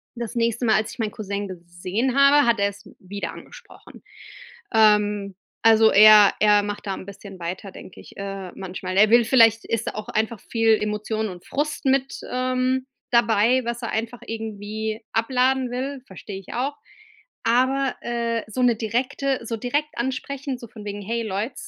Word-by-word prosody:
das 235 0 -6
nächste 235 +1 0
Mal, 220 - +4
als 215 - 0
ich - - -15
meinen 220 -2 -1
Cousin 205 -1 -4
gesehen 185 +7 -3
habe, 280 +1 +6
hat 230 -2 +3
er 200 - +3
es 200 0 -14
wieder 200 +2 -6
angesprochen. - - -14 0.7
Ähm, 210 -2 +3 0.3
also, 225 -1 +6
er 210 -1 +8
er 210 -1 +5
macht 205 +1 -5
da 195 - -1
'n - - -9
bisschen 200 -1 -11
weiter, 180 +3 -6
denke 185 - -12
ich, - - -16
äh, 195 -2 -6
manchmal. 185 0 -5
Er 210 +1 +6
will 235 0 +6
vielleicht 225 -2 +4
ist 230 0 -2
da - - -2
auch 215 0 -6
einfach 220 0 -1
viel 225 -1 +2
Emotionen 215 +1 -2
und 180 -2 -10
Frust 295 +1 -3
mit, 270 0 +1
ähm, 255 +1 0 0.3
dabei, 235 +1 +3
was 235 +1 -3
er 230 - -3
einfach 230 +2 -3
irgendwie 220 0 -5
abladen 255 +2 +1
will, 265 +2 -4
verstehe 190 +1 -9
ich 195 - -11
auch. 270 +4 -2 0.7
Aber, 260 +3 +2
äh, 235 -1 -2
so 220 +4 -4
'ne 240 -2 +4
direkte 250 +4 -1
so 230 - -3
direkt 290 +7 -2
ansprechen, 265 +2 -3
so 235 - -10
von 215 -1 -12
wegen: 205 0 -5
„Hey 230 +4 -2
Leute, 215 +4 -3
225 Hz, 175 wpm, -23 LUFS, 205-250 Hz, 0.7 s, er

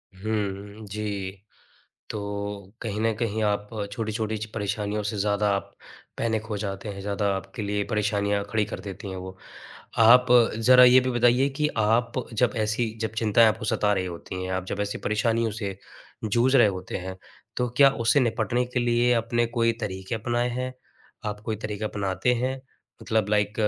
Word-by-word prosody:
हुँ, 100 +1 -4
जी, 100 -2 -4 0.8
तो 100 -1 -5
कहीं 105 -2 -3
न 115 0 +2
कहीं 110 -1 -2
आप 105 0 0 0.2
छोटी-छोटी 110 0 -2
च 105 - -4
परेशानियों 105 0 -2
से 105 +1 -3
ज़्यादा 105 +1 +1
आप 100 - -5 0.5
पैनिक 110 -1 0
हो 110 -2 -3
जाते 100 0 -4
हैं, 100 -1 -6
ज़्यादा 100 +1 -2
आपके 95 +2 -6
लिए 105 0 -1
परेशानियाँ 105 -2 0
खड़ी 110 0 +1
कर - - -6
देती 100 0 -7
हैं 95 - -5
वो। 95 +1 -8 0.7
आप 125 +3 +8 0.3
ज़रा 125 +3 +7
ये 125 +1 +8
भी 130 0 -1
बताइए 120 +3 +3
कि 150 -1 +2
आप 115 +2 +2 0.2
जब 120 +2 +2
ऐसी 110 +2 0
जब 110 - -1
चिंताएँ 110 +1 +5
आपको 110 0 -1
सता 105 -1 +2
रही 95 -2 -1
होती 90 +1 -6
हैं, 95 - -4
आप 95 -1 -2
जब 100 - -4
ऐसी 105 0 -2
परेशानियों 115 +1 +1
से 100 -3 -4 0.5
जूझ 120 +5 +3
रहे 120 -5 +7
होते 95 -2 -4
हैं, 95 +1 -6 0.4
तो 125 0 0
क्या 140 -1 +8 0.2
उससे 140 - +5
निपटने 125 0 +1
के 125 - +2
लिए 120 0 +3
आपने 120 0 +1
कोई 115 0 +1
तरीके 95 0 -4
अपनाएँ 120 +2 0
हैं? 130 +1 -3 0.5
आप 105 0 -3
कोई 110 - -1
तरीके 105 0 -4
अपनाते 100 +3 0
हैं? 130 +2 -2 0.4
मतलब 110 -3 0
लाइक 105 -1 +2
105 Hz, 175 wpm, -26 LUFS, 100-115 Hz, 0.8 s, आप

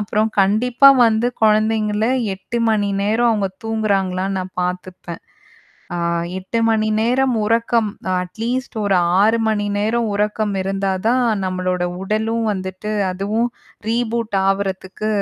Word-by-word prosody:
அப்புறம் 210 +1 0
கண்டிப்பா 235 +7 +4 0.2
வந்து 225 +2 +1 0.2
குழந்தைங்கள 215 0 +2 0.3
8:00 195 +5 -5
மணி 210 -2 +1
நேரம் 225 +4 +2
அவுங்க 205 -3 0 0.2
தூங்குறாங்களான்னு 195 -3 -1
நான் 185 0 -8
பார்த்துப்பேன். 180 -1 -5 0.8
ஆ, - - -3 0.4
8:00 190 +5 -3
மணி 215 -1 +1
நேரம் 250 +2 +2
உறக்கம் 230 0 +1 0.2
அ - - +1
அட்லீஸ்ட் 230 +7 -4
ஒரு 195 -2 +2 0.3
6:00 220 +2 +3
மணி 205 -1 0
நேரம் 225 +2 0
உறக்கம் 210 0 -1
இருந்தா 195 0 -1 0.2
தான் 250 +1 +2 0.2
நம்மளோட 185 -1 -2 0.2
உடலும் 220 +3 -1
வந்துட்டு 190 +2 -5 0.2
அதுவும் 210 +6 -1 0.4
ரீபூட் 230 -2 -1
ஆவுறதுக்கு 195 +1 -2
215 Hz, 120 wpm, -19 LUFS, 195-225 Hz, 0.8 s, கண்டிப்பா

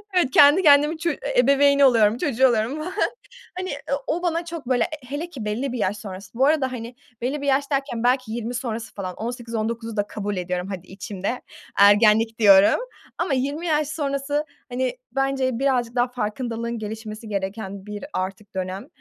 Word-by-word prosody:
Evet, 345 -7 +3
kendi 290 +7 +7
kendimi, 295 +1 +5
ço 335 +2 -1 0.3
ebeveyni 280 +2 +5
oluyorum, 225 -4 +4
çocuğu 265 -1 +3
oluyorum 230 +3 0
falan. 355 +5 -5 0.7
Hani, 370 0 -3
eee, 285 - -4 0.3
o 350 - -1
bana 340 -1 0
çok 335 -5 -7
böyle 250 -2 +3 0.2
hele 300 +6 -4
ki 265 -10 -7
belli 235 +6 -2
bir 250 - -3
yaş 205 -1 0
sonrası, 190 -2 -9
bu 260 +3 +3
arada, 285 -4 +2
hani, 235 0 -6 0.3
belli 265 +5 -2
bir - - -3
yaş 280 +1 +1
derken 270 -5 -1
belki 250 -2 +2
20 235 +1 -4
sonrası 230 -2 -4
falan, 185 -2 -5
18-19'u 230 -1 -4
da 205 -1 0
kabul 205 -1 -4
ediyorum, 180 0 -3
hadi 185 -2 -6
içimde, 195 +4 -5 0.4
ergenlik 215 +2 +5
diyorum 200 - +6 0.4
ama 340 -3 0
20 280 +6 -2
yaş 305 -3 +1
sonrası, 285 -1 -1 0.2
hani, 250 0 -2 0.2
bence 270 -2 0
birazcık 250 -3 +1
daha 245 +1 +3
farkındalığın 235 0 -3
gelişmesi 220 +1 -7
gereken 195 0 -4
bir 210 -1 -6
artık 195 +2 -4
dönem 185 +1 -4
240 Hz, 170 wpm, -23 LUFS, 210-280 Hz, 0.7 s, kendi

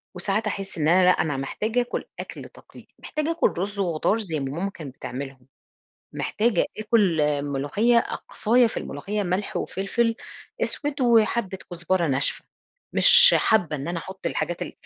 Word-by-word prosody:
وساعات 195 +4 -1
أحس 195 -3 -5
إن 155 -1 0
أنا 185 +3 +5
لأ، 180 - +6
أنا 145 -6 0
محتاجة 215 - -1
آكل 245 - -4
أكْل - - -8
تقليدي، - - -17
محتاجة 305 +2 -3
آكل 330 -3 +1
رز 200 +3 -3
وخضار 180 +4 0
زي 165 -8 -3
ما 135 -1 -4
ماما 195 +3 -1
كانت 145 -8 -10
بتعملهم، 135 -1 -8 0.7
محتاجة 215 -4 0
آكل 210 -6 +2 0.2
ملوخية، 145 - +1
أقصايا 235 +1 +1
في 225 - -6
الملوخية 200 +9 -4
ملح 185 +2 -2
وفلفل 225 +4 -1 0.5
أسود 290 -1 -2
وحبّة 230 -5 +2
كزبرة 175 0 0
ناشفة، 140 0 0 0.5
مش 485 +1 +8
حابّة 180 -8 +2
إن 140 +3 -6
أنا 170 -1 -2
أحط 190 +3 -8
الحاجات 175 - -2
ال - - -6
195 Hz, 155 wpm, -24 LUFS, 160-225 Hz, 0.7 s, مش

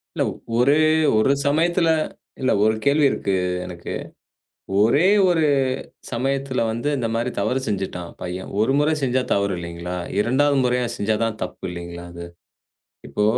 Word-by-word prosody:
இல்லை - - +1 0.3
ஒரே 125 +4 +4 0.4
ஒரு 110 +5 +4
சமயத்தில் 165 +4 +2 0.5
இல்லை 130 - +2
ஒரு 110 +1 +3
கேள்வி 145 +1 +4
இருக்கு 100 - -2 0.3
எனக்கு. 85 -1 -7 0.9
ஒரே 140 - +4 0.2
ஒரு 165 -3 +2 0.7
சமயத்தில் 135 +1 -1
வந்து 115 +6 -2
இந்த 115 -3 -1
மாதிரி 115 +2 -1
தவறு 125 +6 0
செய்துவிட்டான் 95 -4 -3
பையன். 90 +1 -5
ஒரு 110 +5 +3
முறை 150 +2 +2
செய்தால் 130 -1 0
தவறு 100 -1 0
இல்லையா? 85 +1 -5 0.2
2ஆம் 135 +5 +3
முறையாக 125 -1 0
செய்தால்தான் 110 +1 -1
தப்பு 90 - -6
இல்லையா 85 0 -7
அது. 85 0 -8 0.8
இப்போ 105 - 0
115 Hz, 135 wpm, -22 LUFS, 95-135 Hz, 0.9 s, ஒரே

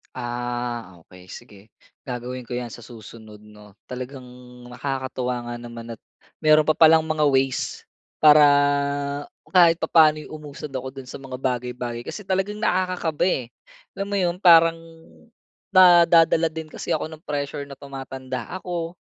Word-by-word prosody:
Ah, 120 -6 -5
okey 90 +1 -17
sige 105 0 -12 0.5
gagawin 125 0 -6
ko 120 - -5
'yan 120 -1 -5
sa - - -10
susunod, 110 -2 -13
'no. 105 -1 -17
Talagang 130 +1 -8 0.5
nakakatuwa 125 -1 -4
nga 120 0 -6
naman 120 -1 -9
at 115 - -9 0.4
meron 155 -1 +5
pa 155 - +2
palang 160 0 +6
mga 155 -1 +1
ways 135 -1 0 0.4
para 150 0 +8 1.1
kahit 175 -3 +6
papaano'y 155 -2 +3
umusad 150 -1 -9
ako 130 0 -5
do'n 135 -2 -9
sa - - -9
mga 135 -1 -8
bagay-bagay. 125 -2 -3
Kasi 210 - -6
talagang 195 +2 -2
nakakakaba 180 -5 0
eh. 130 -9 -1 0.5
Alam 195 - -3
mo 200 - -3
'yon? 175 -2 0
Parang 165 -2 +6 1.0
na 175 -2 +7
nadadala 165 -1 +4
din 160 -1 -8
kasi - - -3
ako 155 - -4
ng 155 +1 -12
pressure 145 -1 -4
na 140 - -10
tumatanda 135 -1 -7
ako. 175 -2 -5
135 Hz, 145 wpm, -23 LUFS, 120-160 Hz, 1.1 s, para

